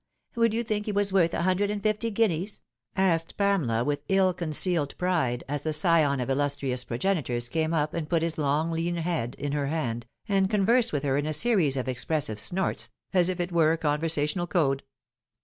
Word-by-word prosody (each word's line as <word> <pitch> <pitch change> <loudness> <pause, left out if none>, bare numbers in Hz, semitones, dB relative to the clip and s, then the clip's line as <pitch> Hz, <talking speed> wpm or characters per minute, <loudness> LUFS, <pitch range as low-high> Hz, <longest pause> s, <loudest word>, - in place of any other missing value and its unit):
Would 230 -2 +2
you 235 - 0
think 215 -1 -3
he - - 0
waa 205 0 +2
worth 175 -4 +4
c. - - -2
hundred 185 +3 +1
and 205 -1 -3
fifty 215 +1 0
guineas 205 -3 -1 0.2
?" 115 - -58
asked 170 -4 +1
Pamela 165 - +1
with 145 +2 -1
ill 190 -1 +3
concealed 165 -2 +1
pride, 160 -10 0
as 145 0 -1
the 155 +1 -2
scion 155 -3 +3
of 125 - -2
illustrious 135 -2 -1
progenitors 125 -3 -1
came 160 +3 -1
up 155 -2 0
and 160 -3 -4
put 165 -2 +1
his 165 -1 -2
long 150 +3 0
lean 165 +1 -1
head 165 -8 -2
in 145 - -3
her 145 -1 -1
hand, 120 -7 -3 0.2
and 195 -1 +2
conversed 225 +4 +2
with 145 -2 -2
her 135 -1 +1
in 145 +1 -1
a 155 - -1
series 175 - +3
of 130 - -3
expressive 130 -3 -2
snouts, 190 - -1 0.2
as 180 -1 +3
it 180 -1 -2
were 165 -2 +3
a - - -1
conversational 155 +2 0
code. 145 -5 +1
165 Hz, 200 wpm, -27 LUFS, 145-190 Hz, 0.2 s, worth